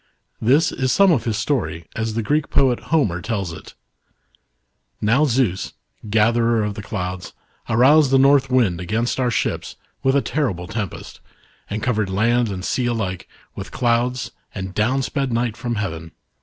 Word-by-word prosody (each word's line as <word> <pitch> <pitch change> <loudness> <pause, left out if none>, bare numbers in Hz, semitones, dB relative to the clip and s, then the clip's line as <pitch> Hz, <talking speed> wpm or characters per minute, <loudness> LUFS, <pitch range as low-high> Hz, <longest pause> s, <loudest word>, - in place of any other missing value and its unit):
This 135 +8 +3
is 130 -1 -1
some 195 +4 +5
of 145 -8 +1
his 110 -3 -1
story 105 - -2
as 110 0 -2
the 115 - -1
Greek 150 +6 0
poet 130 -3 +3
Homer 105 - +1
tells 100 -5 -3
it: - - -12 0.6
" - - -50
Now 135 +7 +4
Zeus, 120 -8 0 0.3
1 105 - -10
gatherer 115 +1 +3
of 105 -1 -2
the 105 - -7
clouds, 95 -4 -5 0.4
aroused 135 +6 +5
the 135 - +4
North 135 0 +4
Wind 110 -10 +2
against 115 +8 -1
our 125 -1 +2
ships - - -2 0.3
with 135 +1 +2
a 140 - +4
terrible 110 - -1
tempest, 100 -1 -6 0.5
and 105 +1 -4
covered 110 -6 0
land 115 +4 +2
and 95 -1 -5
sea 125 -2 0
alike 100 -6 -3 0.3
with - - -7
clouds, 120 +1 0 0.2
and 95 -2 -5
down 125 +7 +1
sped 135 -1 -2
night 115 -1 0
from 120 0 -3
heaven. 80 -6 -4
115 Hz, 170 wpm, -21 LUFS, 100-130 Hz, 0.6 s, some